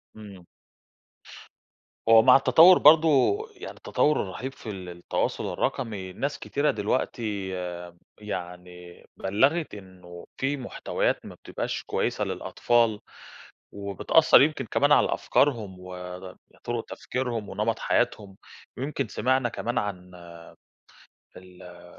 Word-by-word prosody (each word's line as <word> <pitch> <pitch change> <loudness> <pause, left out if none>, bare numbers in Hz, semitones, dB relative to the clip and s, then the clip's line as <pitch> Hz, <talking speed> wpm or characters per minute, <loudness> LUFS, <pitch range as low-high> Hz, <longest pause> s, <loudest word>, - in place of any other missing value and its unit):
إمم. 100 -4 -12 1.6
هو 115 0 +8
مع 125 +2 +7
التطوّر 165 +6 +7
برضه 155 - +5 0.2
يعني 385 - -9
التطوّر 150 - +1
الرهيب 125 +8 -6
في 120 - -10
ال 95 -3 -7
التواصل 85 0 -3
الرقمي، 95 -5 -3
ناس 140 +7 -3
كتيرة 145 +1 0
دلوقتي 105 -2 -2 0.7
يعني 90 -2 -8
بلّغت 135 - +1
إنه 90 -3 -13
في 140 +2 -1
محتويات 125 - -2
ما - - -10
بتبقاش - - -5
كويسة - - -2
للأطفال، 115 -3 0 0.7
وبتأثّر 100 - +3
يمكن 140 -2 +1
كمان 145 +5 +1
على 145 - +4
أفكارهم 110 -10 0
ود 90 0 -9 0.3
طُرق 120 -1 -3
تفكيرهم 120 -5 -4
ونمط 110 +2 -2
حياتهم، 105 -5 -1 0.4
ويمكن 140 0 -3
سمعنا 130 +2 0
كمان 115 +3 -4
عن 90 -3 -4 1.3
ال 90 -1 -14
105 Hz, 105 wpm, -26 LUFS, 95-130 Hz, 1.6 s, هو